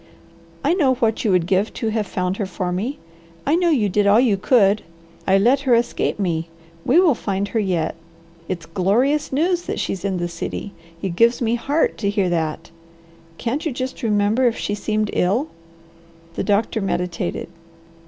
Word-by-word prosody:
I - - +3
know 280 -8 +3
what 225 -3 0
you 220 - +1
would 180 -3 +3
give 190 +4 +1
to 225 - -1
have 215 -2 -1
found 185 +1 -2
her 205 - -2
for 180 0 -3
me. 225 +11 -2 0.5
I 295 - +3
know 350 0 +2
you 250 -10 +2
did 200 +1 +1
all 205 +3 +6
you 240 -5 +3
could. 205 0 +3 0.5
I 190 0 +5
let 245 +7 +4
her 265 -3 +3
escape 235 +1 0
me. 170 -4 -1 0.3
We 285 +8 +4
will 355 -5 +5
find 200 -3 -2
her 225 - 0
yet. 180 -6 0 0.6
It's 170 -3 -4
glorious 220 - +1
news 340 +6 +1
that - - -3
she's 190 - -3
in 195 -2 -1
the 175 0 -1
city. 170 +4 -5 0.3
It 185 -3 -2
gives 230 +4 +4
me 230 -1 0
heart 280 +7 0
to 200 - 0
hear 200 -3 +1
that. 165 -1 -2 0.7
Can't 260 +6 -2
you 315 - -1
just 255 +1 -5
remember 215 +3 +2
if 235 - 0
she 205 - -2
seemed 215 0 -1
ill?" 225 - +1 0.8
The - - -2
doctor 215 +1 +1
meditated. 180 -2 -2
210 Hz, 185 wpm, -21 LUFS, 185-250 Hz, 0.8 s, all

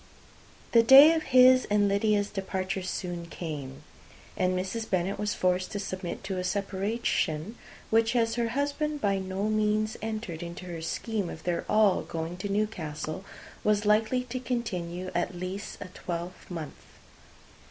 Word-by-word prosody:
The 230 - +7
day 275 +7 +9
of 325 - 0
his 255 0 +7
and 205 -1 +2
Lydia's 205 0 +1
departure 190 -1 -3
soon 175 -2 -4
came; 150 -5 -6 0.5
and 185 0 +1
Mrs. 205 +5 -3
Bennet 185 +1 0
was 210 0 -1
forced 185 0 0
to 205 - -2
submit 185 -3 -5
to 190 -1 -3
a - - -2
separation, 195 -2 -1 0.4
which, 225 +2 +3
as 230 -1 +2
her 235 0 0
husband 295 +1 -1
by 200 -5 +1
no 190 +1 -3
means 215 0 +1
entered 215 -6 -4
into 170 +1 -7
her 170 -2 -6
scheme 200 +3 -2
of 160 - -9
their 175 -1 -1
all 210 -3 +4
going 165 +2 -5
to 200 +2 -4
Newcastle, 185 -5 -3 0.4
was 210 0 +2
likely 220 +4 +3
to 250 +1 -5
continue 185 -8 -3
at 175 +1 -1
least 185 +3 -5
a - - -5
twelvemonth. 170 -3 -6
195 Hz, 150 wpm, -28 LUFS, 180-220 Hz, 0.5 s, day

